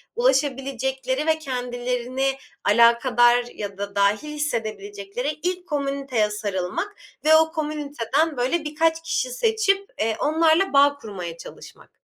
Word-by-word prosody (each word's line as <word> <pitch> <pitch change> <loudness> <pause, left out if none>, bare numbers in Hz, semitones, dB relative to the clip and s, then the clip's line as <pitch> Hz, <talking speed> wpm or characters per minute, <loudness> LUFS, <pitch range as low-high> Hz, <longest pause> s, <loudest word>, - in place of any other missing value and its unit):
ulaşabilecekleri 270 - 0
ve 315 0 +2
kendilerini 250 -1 -2 0.3
alakadar 235 +3 +5 0.5
ya 200 -2 -6
da 200 0 -5
dâhil 200 +7 +2
hissedebilecekleri 215 -2 -3
ilk 360 0 -2
komüniteye 275 -7 -1
sarılmak 210 - -3 0.3
ve 315 0 +7
o 320 0 +4
komüniteden 295 -2 -1
böyle 265 +7 0
birkaç 320 +2 +1
kişi 330 -6 -1
seçip, 395 - +1
eee, 220 0 +1
onlarla 320 +3 +3
bağ 285 +1 +5
kurmaya 180 -9 -7
çalışmak. - - -13
270 Hz, 115 wpm, -23 LUFS, 225-315 Hz, 0.5 s, ve